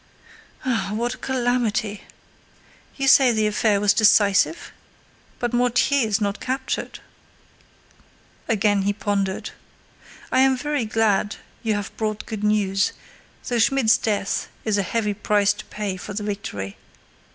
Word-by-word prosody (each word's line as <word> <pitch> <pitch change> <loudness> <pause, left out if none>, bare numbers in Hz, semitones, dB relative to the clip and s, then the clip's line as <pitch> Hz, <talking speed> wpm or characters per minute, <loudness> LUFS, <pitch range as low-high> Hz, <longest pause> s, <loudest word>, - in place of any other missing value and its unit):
"Ah 220 -6 -1
what 240 +3 -1
a - - -10
calamity! 240 -5 -1 0.9
You 275 -1 -1
say 265 -2 +7
the 220 -2 +1
affair 210 -1 +2
was 205 0 +3
decisive? 205 +6 +3 0.7
But 240 0 -2
Mortier 245 +1 +2
is 210 0 +1
not 200 -1 -2
captured." 260 +1 -3 1.5
Again 210 -3 +2
he 200 +1 0
pondered. 200 -2 -2 0.8
"I - - +3
am 265 0 +4
very 290 -2 -1
glad 215 -2 +1 0.3
you 220 -3 0
have 205 0 -5
brought 215 -1 -3
good 215 -2 -6
news, 205 -2 +1 0.5
though 245 -3 0
Schmidt's 240 -1 +3
death 205 -2 -1 0.2
is 210 -2 +1
a - - +3
heavy 210 +1 -1
price 205 0 +2
to 205 - -10
pay 205 -3 -4
for 200 +2 -8
the 210 - -3
victory. 100 - -5
215 Hz, 135 wpm, -23 LUFS, 205-240 Hz, 1.5 s, say